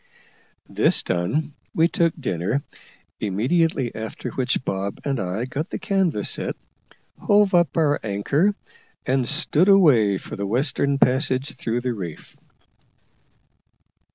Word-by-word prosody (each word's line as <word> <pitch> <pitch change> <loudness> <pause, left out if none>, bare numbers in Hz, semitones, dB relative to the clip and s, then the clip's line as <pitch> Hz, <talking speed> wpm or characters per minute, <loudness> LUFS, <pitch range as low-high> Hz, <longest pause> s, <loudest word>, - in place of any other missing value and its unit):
This - - +2
done, 95 - -1 0.2
we 165 +1 +4
took 170 -1 +1
dinner, 110 - -1 0.6
immediately 125 - 0
after 110 0 -6
which 130 0 -1
Bob 100 +1 -3
and 135 -3 -1
I 100 +5 -2
got 135 +5 -4
the - - -4
canvas 190 - 0
set, - - -3 0.6
hove 205 -1 +3
up 175 -3 +3
our 150 -3 +2
anchor, 140 - +1 0.5
and 130 -1 0
stood 165 +4 +2
away 130 - +5
for - - -8
the 100 0 -3
western 135 +4 0
passage 130 +1 +1
through 120 +1 -2
the 125 0 -2
reef. 90 -8 -8
130 Hz, 125 wpm, -23 LUFS, 105-160 Hz, 0.6 s, away